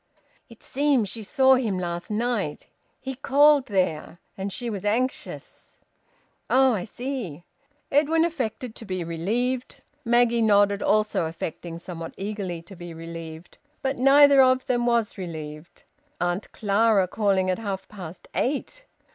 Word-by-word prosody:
"It 230 - -15
seems 275 -6 +1
she 225 - -7
saw 265 +5 +4
him 230 -7 +1
last 175 -1 -4
night. 215 -7 -2 0.3
He 265 0 -5
called 280 +1 +4
there. 180 -6 -1 0.2
And 195 +1 -4
she 240 +5 -4
was 205 -5 -4
anxious." 240 +5 -3 0.7
"Oh! 265 -1 +5
I 185 -5 -2
see!" 240 - -5 0.5
Edwin 310 +3 +3
affected 255 -7 -3
to 225 - -10
be 185 -3 -3
relieved. 230 +10 -2 0.3
Maggie 235 -1 +3
nodded, 205 -2 +4
also 215 -5 +2
affecting, 165 +1 -6
somewhat 170 -1 -8
eagerly, 195 -4 -4
to 195 +3 -13
be 175 -1 -9
relieved. 165 0 -9 0.2
But 265 -1 -1
neither 280 +1 +7
of 255 0 +4
them 245 -1 0
was 230 -4 +1
relieved. 155 -3 -8 0.4
Auntie 175 +3 -1
Clara 205 -1 +2
calling 190 -2 +1
at 185 - -2
half 200 -3 -4
past 185 -5 -10
eight! 300 - -2
210 Hz, 140 wpm, -25 LUFS, 180-255 Hz, 0.7 s, neither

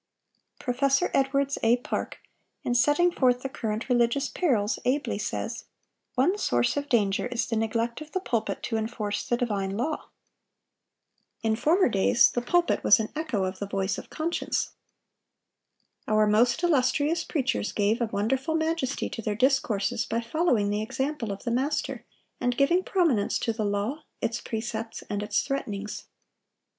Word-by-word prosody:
Prof. 245 0 -4 0.3
Edwards 275 +1 +1
A. 230 +2 +4
Park, 245 - -4 0.4
in 245 - 0
setting 295 +8 +4
forth 250 -5 +2
the 270 - -2
current 220 -3 -3
religious 245 +2 +2
perils, 235 - +1
ably 275 +4 0
says: - - -4 0.5
"One 350 +11 +2
source 120 - +1
of 285 0 -3
danger 205 -2 +2
is 245 -1 -1
the 230 - -2
neglect 230 +3 -1
of 305 0 -9
the 375 - -1
pulpit 235 - -2
to 225 - -1
enforce 215 -2 -3
the 240 - +2
divine 200 -5 -1
law. 300 +7 -2 1.3
In 220 -1 +2
former 335 - +3
days 210 +1 +4
the 245 - -1
pulpit 345 +8 +1
was 205 - +7
an 215 - -2
echo 300 -11 -1
of 185 0 -3
the 205 - -3
voice 195 0 -1
of - - -11
conscience.... 330 +2 -2 1.4
Our 215 0 +4
most 235 +8 +3
illustrious 300 +1 +2
preachers 260 -8 -1
gave 210 +3 +1
a 235 - +2
wonderful 255 +10 -1
majesty 315 -4 -1
to 225 - -5
their 210 -1 -2
discourses 240 -5 +1
by 230 - 0
following 235 -5 +1
the 210 +1 0
example 260 0 -2
of 195 - -6
the 235 - -2
Master, 270 +5 -1 0.4
and 245 0 0
giving 340 +7 +3
prominence 315 - +2
to 230 - -1
the 215 -1 -2
law, 205 +9 -1 0.2
its 230 +1 -2
precepts, 225 0 -4
and 205 0 -1
its 205 0 0
threatenings. 210 -7 -4
240 Hz, 155 wpm, -27 LUFS, 215-280 Hz, 1.4 s, was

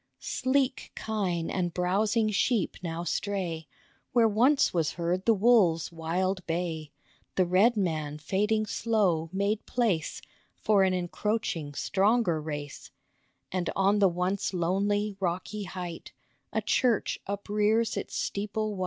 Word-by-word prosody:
Sleek 260 0 -1
kine 185 -7 -2
and 175 -3 -2
browsing 210 +5 +1
sheep 215 -1 +1
now 170 -1 -4
stray 175 -5 -2 0.5
Where 235 -2 +5
once 250 +7 +3
was 165 -4 0
heard 175 +2 -1
the 230 - +5
wolves' 195 -7 +4
wild 180 +3 -1
bay, 165 -3 -3 0.4
The 185 - +3
red 200 +7 +4
man 155 -6 -1
fading 210 +8 0
slow 200 -8 +1
made 200 +3 0
place 210 -11 0 0.4
For 210 -2 +2
an 185 -1 +2
encroaching, 175 -4 -2
stronger 195 -4 +2
race, 145 -2 -6 0.6
And 180 -2 -1
on 200 +2 +3
the 195 -2 +5
once 180 +2 -1
lonely, 200 +4 0
rocky 190 +3 -2
height 180 -2 -7 0.4
A - - -1
church 240 -6 +1
uprears 210 +3 +1
its - - -5
steeple 210 +1 -2
white. - - -7
190 Hz, 125 wpm, -28 LUFS, 170-215 Hz, 0.6 s, Where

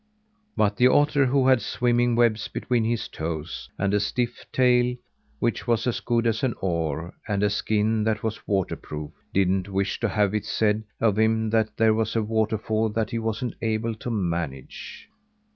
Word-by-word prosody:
But 105 -1 +2
the 125 - +6
otter, 145 0 +4
who 130 0 +2
had 130 -3 +5
swimming 120 0 +1
webs 115 -3 +2
between 120 -3 -1
his 115 +1 -1
toes, 80 0 -5
and 100 +1 0
a 105 - +3
stiff 120 +4 -2
tail 125 -1 +3 0.4
which 120 +1 -1
was 115 -2 +1
as 125 - 0
good 120 -1 0
as 115 -1 +1
an 130 -4 0
oar 85 -2 -2
and 100 -2 0
a 105 - +2
skin 110 +1 +1
that 110 -1 0
was 110 -1 -4
water 95 -3 0
proof, 75 -1 -7 0.2
didn't 95 0 +1
wish 100 0 -1
to 115 - 0
have 105 0 +1
it 105 - -1
said 110 0 +1
of 110 -2 +2
him 110 0 +2
that 110 -1 +1
there 110 -1 +4
was 110 0 -1
a 115 - +2
waterfall 110 0 0
that 110 0 -2
he 115 - -1
wasn't 115 +2 -2
able 115 0 -1
to 110 +3 -6
manage. 85 - -4
110 Hz, 180 wpm, -25 LUFS, 100-115 Hz, 0.4 s, the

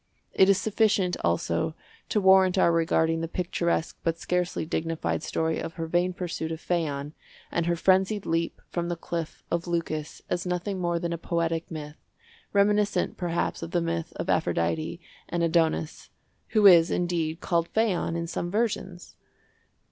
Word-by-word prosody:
It 190 - +5
is 195 - +5
sufficient, 205 -4 +2
also, 85 - 0 0.3
to 210 - +2
warrant 190 -1 +5
our 170 - +5
regarding 165 0 +2
the 165 - -2
picturesque 170 -1 -1
but 165 0 0
scarcely 180 -1 -1
dignified 165 0 -2
story 160 0 -1
of 165 - -5
her 165 - -3
vain 175 +2 +1
pursuit 170 -3 -4
of 160 - -4
Phaon 150 -5 -2 0.4
and 170 0 0
her 170 - +2
frenzied 190 +4 +2
leap 165 0 -1
from 170 0 -2
the 175 - -1
Cliff 165 -1 -5
of 170 +1 -1
Leucas 165 -3 -3
as 175 - -1
nothing 180 +2 -2
more 175 -1 0
than 170 0 -2
a 170 - -4
poetic 165 -1 -1
myth, 150 -2 -7 0.5
reminiscent, 205 -2 +2
perhaps, 175 -1 -2
of 165 - -5
the 175 - +1
myth 165 -1 -2
of - - -4
Aphrodite 155 - 0 0.3
and 170 0 -1
Adonis—who 165 +5 -1
is, 170 -3 +8
indeed, 170 -2 -1
called 170 -2 0
Phaon 210 -7 0
in 170 0 -2
some 170 +1 -3
versions. 195 -4 -2
170 Hz, 155 wpm, -27 LUFS, 165-180 Hz, 0.5 s, is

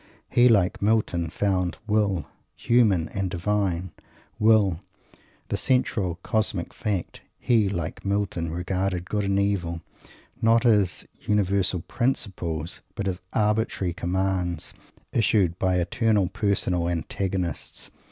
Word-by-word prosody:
He, 120 +1 +6
like 100 -6 +3
Milton, 100 -6 +1
found 90 0 0
Will 105 -6 +1 0.3
human 105 -9 +3
and 95 -1 -2
divine 95 -1 -1 0.5
Will 105 -6 +4 0.7
the - - 0
central 110 -9 +1
cosmic 105 -5 -1
fact. 100 -5 -3 0.2
He, 110 -5 +2
like 85 -5 -4
Milton, 100 -5 -1
regarded 90 +1 -2
Good 105 0 -1
and 100 0 +1
Evil, 95 -4 0 0.6
not 115 +1 +4
as 105 -6 +3
universal 100 -3 0
principles, 90 - -2
but 100 - -3
as 95 -1 -2
arbitrary 105 -4 0
commands, 90 -1 -1 0.4
issued 100 -6 +2
by 95 -1 +2
eternal 105 +2 +2
personal 95 -5 0
antagonists! 90 +1 -3
95 Hz, 110 wpm, -25 LUFS, 90-105 Hz, 0.7 s, He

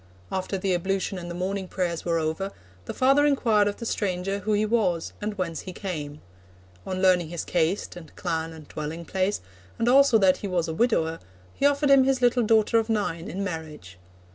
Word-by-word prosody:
After 190 +1 -2
the 190 0 0
ablution 190 +1 -1
and 175 0 -7
the 170 - -5
morning 190 +1 -3
prayers 175 -3 -2
were 170 -1 0
over, 160 +5 -2 0.3
the - - -5
father 275 +3 +4
inquired 230 -8 +3
of 205 - -2
the 230 - -6
stranger 195 -2 -1
who 210 +2 -1
he 210 +1 +2
was 200 -7 0
and 210 0 -3
whence 170 -3 -2
he 185 - -8
came. 150 -7 -5 0.7
On 185 0 -3
learning 180 -3 +4
his 170 -1 -4
caste, 175 +3 0
and 160 -4 -12
clan, 165 -3 -2
and 160 -2 -12
dwelling 155 +3 -6
place, 190 +3 -1 0.4
and 230 - 0
also 270 -1 +6
that 190 -3 +4
he 205 - -5
was 175 -3 0
a 160 - -3
widower, 165 -6 +1 0.3
he 280 - +3
offered 285 0 +2
him 275 -1 +7
his 265 0 +2
little 245 0 +3
daughter 225 0 +3
of 225 0 -3
nine 205 -6 -1
in 195 +3 -3
marriage. 155 - -7
190 Hz, 200 wpm, -26 LUFS, 170-215 Hz, 0.7 s, him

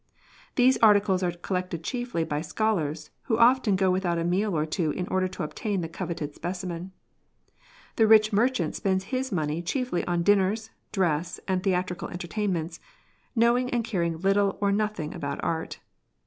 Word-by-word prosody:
These 255 +1 +4
articles 205 -3 +4
are 180 - +1
collected 175 -1 -4
chiefly 240 -6 -2
by 150 -2 -2
scholars, 160 -7 -1
who 225 -4 +1
often 235 -3 +4
go 190 0 +2
without 180 -2 0
a 165 - -1
meal 185 +1 0
or 155 - +1
two 160 0 -1
in 180 +4 -3
order 185 0 +1
to 185 - -6
obtain 195 +5 -2
the 165 - -3
coveted 165 -3 -5
specimen; 180 +1 -5 1.1
the 225 -2 +5
rich 215 0 +6
merchant 210 -6 +1
spends 190 -1 0
his 260 +1 -1
money 155 -2 -1
chiefly 245 +1 -1
on 175 -1 0
dinners, 205 +3 +2 0.2
dress, 175 -3 0
and 185 -1 0
theatrical 180 -2 -1
entertainments, 175 -2 -3 0.6
knowing 240 +2 +3
and 240 -2 0
carinoj 170 -6 -2
little 195 0 +2
or 200 -1 +2
nothino^ 205 -7 -1
about 140 -1 -4
art. 160 -1 -3
185 Hz, 160 wpm, -27 LUFS, 170-215 Hz, 1.1 s, rich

